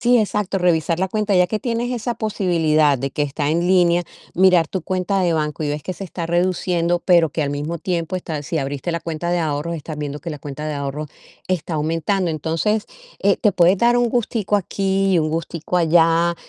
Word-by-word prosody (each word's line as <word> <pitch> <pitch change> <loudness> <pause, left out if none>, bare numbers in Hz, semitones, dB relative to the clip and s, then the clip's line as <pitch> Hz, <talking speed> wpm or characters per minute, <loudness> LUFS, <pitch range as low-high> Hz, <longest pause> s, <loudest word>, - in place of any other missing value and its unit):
Sí, 245 0 +4
exacto, 210 -2 0
revisar 165 -2 +1
la 190 +1 0
cuenta, 210 0 0
ya 180 -1 +5
que 215 +4 -2
tienes 235 +2 -2
esa 240 -1 -2
posibilidad 160 - +2
de 135 +2 -3
que 150 - -2
está 145 0 -2
en 165 +3 +1
línea, 175 -1 +4 0.3
mirar 180 -3 +4
tu 185 +1 -4
cuenta 185 +2 -1
de 175 -2 +2
banco 155 -1 -2
y 150 - -1
ves 150 0 -3
que 185 - -5
se 195 - -7
está 170 -2 -5
reduciendo, 175 0 +1
pero 170 -4 +4
que 155 - -2
al 145 - -1
mismo 145 +4 -3
tiempo 170 +1 -2
está 160 -5 -4
si 160 +3 -2
abriste 140 +4 -3
la 170 - -2
cuenta 165 +1 -3
de 175 - +1
ahorros, 155 +1 -2
estás 155 0 -7
viendo 145 -1 -4
que 170 - -7
la 150 -3 -5
cuenta 145 +1 -6
de 155 - -3
ahorros 140 +2 -4 0.4
está 180 -2 -2
aumentando, 165 +4 0
entonces, 165 +7 -1 0.3
eh, 200 0 +2
te 210 - +3
puedes 180 +1 +4
dar 240 +2 +4
un 245 -1 +2
gustico 220 -3 0
aquí 195 0 0
y - - +4
un 155 -1 0
gustico 165 +2 -2
allá 165 0 +3
170 Hz, 215 wpm, -20 LUFS, 155-190 Hz, 0.4 s, ya